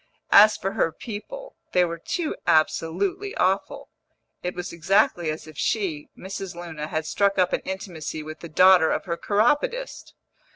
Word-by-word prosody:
As 210 Hz, +1 st, +8 dB
for 195 Hz, -, -3 dB
her 195 Hz, -5 st, 0 dB
people, 255 Hz, -, -8 dB, 0.2 s
they 180 Hz, -1 st, +4 dB
were 170 Hz, -1 st, -5 dB
too 320 Hz, -, -3 dB
absolutely 180 Hz, -, +1 dB
awful; -, -, -1 dB, 0.5 s
it 180 Hz, 0 st, -4 dB
was 180 Hz, -1 st, -5 dB
exactly 175 Hz, -1 st, +2 dB
as 155 Hz, +1 st, -5 dB
if 155 Hz, -2 st, -11 dB
she, 165 Hz, -3 st, -1 dB
Mrs. 190 Hz, -1 st, -7 dB
Luna, 160 Hz, -3 st, -6 dB
had 155 Hz, 0 st, -3 dB
struck 200 Hz, +4 st, +1 dB
up 180 Hz, -1 st, +2 dB
an -, -, 0 dB
intimacy 175 Hz, -5 st, -5 dB
with 155 Hz, +1 st, -9 dB
the 170 Hz, -, -9 dB
daughter 180 Hz, 0 st, +6 dB
of -, -, -1 dB
her 170 Hz, -2 st, -2 dB
chiropodist. 295 Hz, -, 0 dB
180 Hz, 160 wpm, -24 LUFS, 160-205 Hz, 0.5 s, As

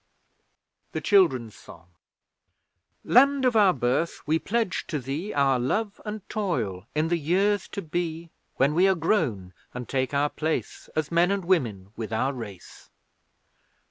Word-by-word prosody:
THE -, -, -2 dB
CHILDREN'S 135 Hz, -, +3 dB
SONG 85 Hz, -3 st, -14 dB, 1.2 s
Land 275 Hz, +2 st, +4 dB
of 250 Hz, -2 st, +2 dB
our 205 Hz, -3 st, +6 dB
Birth, 130 Hz, +4 st, -1 dB
we 160 Hz, +2 st, +2 dB
pledge 225 Hz, -1 st, -1 dB
to 155 Hz, -, -2 dB
thee 145 Hz, -, -4 dB
Our 135 Hz, -3 st, +2 dB
love 205 Hz, -, -1 dB
and 210 Hz, -2 st, -6 dB
toil 115 Hz, -, -2 dB
in 155 Hz, +2 st, +1 dB
the 170 Hz, 0 st, +1 dB
years 195 Hz, +6 st, +1 dB
to 200 Hz, -, -6 dB
be; 165 Hz, 0 st, -4 dB, 0.2 s
When 140 Hz, +3 st, +2 dB
we 180 Hz, +4 st, +4 dB
are 190 Hz, -, +3 dB
grown 140 Hz, -, 0 dB, 0.2 s
and 125 Hz, -1 st, -5 dB
take 130 Hz, -1 st, -1 dB
our 145 Hz, +1 st, +1 dB
place, 160 Hz, +1 st, -3 dB
As 155 Hz, 0 st, -1 dB
men 170 Hz, +2 st, +3 dB
and 200 Hz, -2 st, -1 dB
women 115 Hz, -, 0 dB
with 115 Hz, -1 st, -5 dB
our 130 Hz, +5 st, 0 dB
race. 105 Hz, -8 st, -10 dB
160 Hz, 150 wpm, -26 LUFS, 125-195 Hz, 1.2 s, our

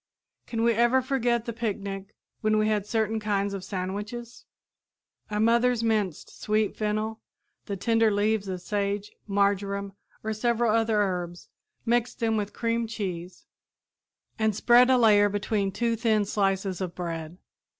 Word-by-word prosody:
Can 225 Hz, -1 st, -2 dB
we 235 Hz, 0 st, +4 dB
ever 240 Hz, +3 st, +4 dB
forget 240 Hz, -3 st, 0 dB
the 235 Hz, -, -4 dB
picnic 200 Hz, -3 st, -4 dB, 0.2 s
when 215 Hz, 0 st, +2 dB
we 215 Hz, 0 st, +2 dB
had 210 Hz, -2 st, 0 dB
certain 220 Hz, 0 st, 0 dB
kinds 200 Hz, -1 st, -1 dB
of 195 Hz, -2 st, -5 dB
sandwiches? 205 Hz, +6 st, -5 dB, 0.8 s
Our 210 Hz, 0 st, -2 dB
mothers 235 Hz, +1 st, +3 dB
minced 210 Hz, -7 st, -1 dB
sweet 215 Hz, -1 st, +1 dB
fennel, 215 Hz, +1 st, -2 dB, 0.5 s
the 200 Hz, -2 st, -3 dB
tender 225 Hz, +2 st, +3 dB
leaves 205 Hz, 0 st, +1 dB
of 185 Hz, -1 st, -4 dB
sage, 205 Hz, 0 st, -2 dB, 0.2 s
marjoram 200 Hz, 0 st, 0 dB, 0.3 s
or 220 Hz, 0 st, -1 dB
several 235 Hz, +1 st, +1 dB
other 225 Hz, -1 st, +2 dB
herbs, 180 Hz, -3 st, -2 dB, 0.4 s
mixed 240 Hz, 0 st, 0 dB
them 225 Hz, -1 st, +1 dB
with 205 Hz, -1 st, -2 dB
cream 230 Hz, +1 st, -1 dB
cheese, 185 Hz, -5 st, -5 dB, 0.9 s
and 220 Hz, -2 st, +2 dB
spread 245 Hz, +3 st, +5 dB
a 260 Hz, -, +5 dB
layer 210 Hz, -3 st, +5 dB
between 205 Hz, -1 st, -1 dB
two 230 Hz, +3 st, 0 dB
thin 220 Hz, -2 st, +2 dB
slices 195 Hz, -2 st, 0 dB
of 180 Hz, -2 st, -4 dB
bread. 165 Hz, -1 st, -5 dB
215 Hz, 145 wpm, -27 LUFS, 200-230 Hz, 0.9 s, spread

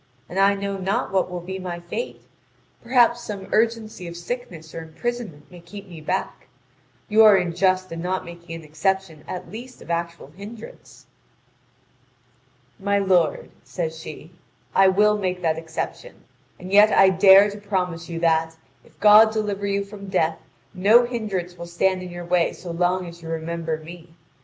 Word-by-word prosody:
And 190 Hz, -, -4 dB
I 200 Hz, +1 st, +5 dB
know 200 Hz, 0 st, -3 dB
not 190 Hz, +1 st, -1 dB
what 190 Hz, -1 st, +1 dB
will 180 Hz, -1 st, -5 dB
be 190 Hz, +2 st, -6 dB
my 180 Hz, -2 st, -5 dB
fate 175 Hz, -, -6 dB, 0.6 s
perhaps 240 Hz, -1 st, +3 dB
some 205 Hz, -4 st, -7 dB
urgency 220 Hz, -4 st, 0 dB
of 170 Hz, 0 st, -8 dB
sickness 170 Hz, -5 st, -7 dB
or 165 Hz, -, -5 dB
imprisonment 170 Hz, -1 st, -6 dB
may 175 Hz, -, -12 dB
keep 195 Hz, +4 st, -11 dB
me 170 Hz, -4 st, -11 dB
back: 185 Hz, -1 st, -3 dB, 0.6 s
you 220 Hz, +1 st, +5 dB
are 215 Hz, -2 st, +8 dB
unjust 185 Hz, +1 st, +1 dB
in 165 Hz, 0 st, -5 dB
not 185 Hz, +2 st, -2 dB
making 170 Hz, -1 st, -9 dB
an 165 Hz, -, -9 dB
exception 160 Hz, +1 st, -2 dB
at 180 Hz, -, -7 dB
least 245 Hz, +4 st, -9 dB
of -, -, -8 dB
actual 170 Hz, -3 st, -4 dB
hindrance." 210 Hz, +6 st, -12 dB, 1.7 s
"My 200 Hz, +1 st, +1 dB
lord," 185 Hz, -5 st, +1 dB
says 160 Hz, -3 st, -4 dB
she, 160 Hz, 0 st, -10 dB, 0.4 s
"I 195 Hz, 0 st, +6 dB
will 210 Hz, +2 st, +3 dB
make 180 Hz, -2 st, -2 dB
that 160 Hz, -1 st, +1 dB
exception. 165 Hz, -, -6 dB, 0.4 s
And 185 Hz, +1 st, -9 dB
yet 210 Hz, +1 st, +7 dB
I 195 Hz, -, +6 dB
dare 195 Hz, +2 st, +7 dB
to 205 Hz, -, -9 dB
promise 180 Hz, -5 st, -3 dB
you 165 Hz, -1 st, -4 dB
that, 160 Hz, -1 st, +2 dB, 0.3 s
if -, -, -24 dB
God 215 Hz, +1 st, +7 dB
deliver 205 Hz, -2 st, -2 dB
you 200 Hz, 0 st, -1 dB
from 200 Hz, 0 st, -10 dB
death, 165 Hz, -4 st, 0 dB, 0.3 s
no 215 Hz, +6 st, +5 dB
hindrance 195 Hz, -8 st, -4 dB
will 170 Hz, -, -7 dB
stand 185 Hz, +2 st, 0 dB
in 180 Hz, -, -7 dB
your 175 Hz, 0 st, -7 dB
way 175 Hz, -1 st, +1 dB
so 175 Hz, -, -8 dB
long 180 Hz, +2 st, 0 dB
as 170 Hz, 0 st, -11 dB
you 165 Hz, -, -9 dB
remember 165 Hz, 0 st, -3 dB
me. 165 Hz, +1 st, -13 dB
185 Hz, 170 wpm, -23 LUFS, 170-200 Hz, 1.7 s, are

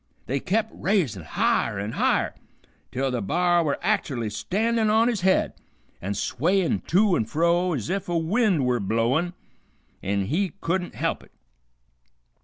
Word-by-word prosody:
They 135 Hz, +6 st, -1 dB
kep' 215 Hz, +7 st, 0 dB
raisin' 160 Hz, -, 0 dB
higher 80 Hz, -, 0 dB
an' 100 Hz, +2 st, -3 dB
higher, -, -, +1 dB, 0.6 s
till 135 Hz, +1 st, -1 dB
the 125 Hz, -, -1 dB
b'ar 175 Hz, -, +2 dB
were 145 Hz, -3 st, 0 dB
act'ally 145 Hz, -, 0 dB
standin' 220 Hz, -, 0 dB
on 220 Hz, +2 st, +4 dB
his 230 Hz, -6 st, 0 dB
head, 190 Hz, +1 st, +2 dB, 0.5 s
an' 100 Hz, +3 st, -3 dB
swayin' 170 Hz, -, +1 dB
to 195 Hz, +1 st, +4 dB
and 110 Hz, -, -1 dB
fro 170 Hz, +4 st, +2 dB
ez 120 Hz, -9 st, -3 dB
if 195 Hz, -2 st, -2 dB
a 175 Hz, -, +1 dB
wind 180 Hz, -, +2 dB
were 125 Hz, -1 st, +1 dB
blowin' 115 Hz, -, +1 dB
him 175 Hz, -, -8 dB, 0.7 s
an' 100 Hz, 0 st, -1 dB
he 175 Hz, -, -1 dB
couldn't 180 Hz, +1 st, -2 dB
help -, -, -1 dB
it. -, -, -19 dB
170 Hz, 155 wpm, -25 LUFS, 120-195 Hz, 0.7 s, on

